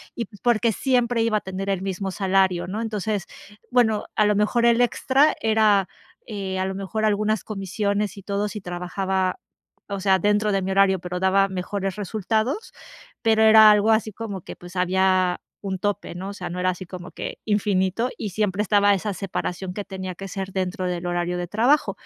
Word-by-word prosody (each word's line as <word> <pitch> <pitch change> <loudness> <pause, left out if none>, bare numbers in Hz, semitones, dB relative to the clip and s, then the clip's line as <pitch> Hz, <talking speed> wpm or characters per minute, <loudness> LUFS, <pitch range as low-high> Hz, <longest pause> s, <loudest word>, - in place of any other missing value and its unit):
y, 235 - -3
pues, 205 0 -17
porque 235 -1 +2
siempre 245 0 +1
iba 225 -1 +2
a - - -3
tener 190 +1 -5
el 195 -2 0
mismo 195 0 -3
salario, 190 -2 +1
¿no? 210 +4 -3
Entonces, 215 -3 -2 0.4
bueno, 230 -4 +2
a 215 - +4
lo 210 0 +3
mejor 215 +3 +2
el 235 0 +4
extra 265 +4 +3
era, 215 -4 +3 0.4
eh, 195 -3 -4
a 185 - 0
lo 190 0 -3
mejor 200 +3 -3
algunas 215 0 +1
comisiones 205 0 -2
y 200 - -11
todo 200 +1 -1
si 210 -1 -6
trabajaba, 185 +1 -2 0.5
o 200 -1 -3
sea, 190 0 +3
dentro 210 +2 +1
de 195 - +1
mi 190 - -2
horario, 190 -1 +4
pero 180 0 -5
daba 195 +1 +3
mejores 190 +1 -3
resultados, 220 - -2 0.5
pero 220 -1 +3
era 220 0 +9
algo 210 +1 +4
así 220 -1 +1
como 200 -4 -6
que, - - -9
pues, 175 +1 -11
había 185 0 +2 0.2
un 190 -2 -4
tope, 205 0 -2
¿no? 185 +3 -6
O - - -6
sea, 180 -4 -6
no 180 - -4
era 185 0 +2
así 185 0 -4
como 180 0 -9
que - - -6
infinito 205 +1 +1
y 210 - -3
siempre 205 +1 -1
estaba 205 0 +4
esa 200 +1 -2
separación 180 -1 -4
que 205 - -4
tenía 190 -2 -6
que 195 +2 -8
ser 195 0 -5
dentro 185 0 -2
del 180 -1 -3
horario 175 0 -1
de 175 - -3
trabajo 240 - +2
195 Hz, 195 wpm, -23 LUFS, 185-215 Hz, 0.5 s, era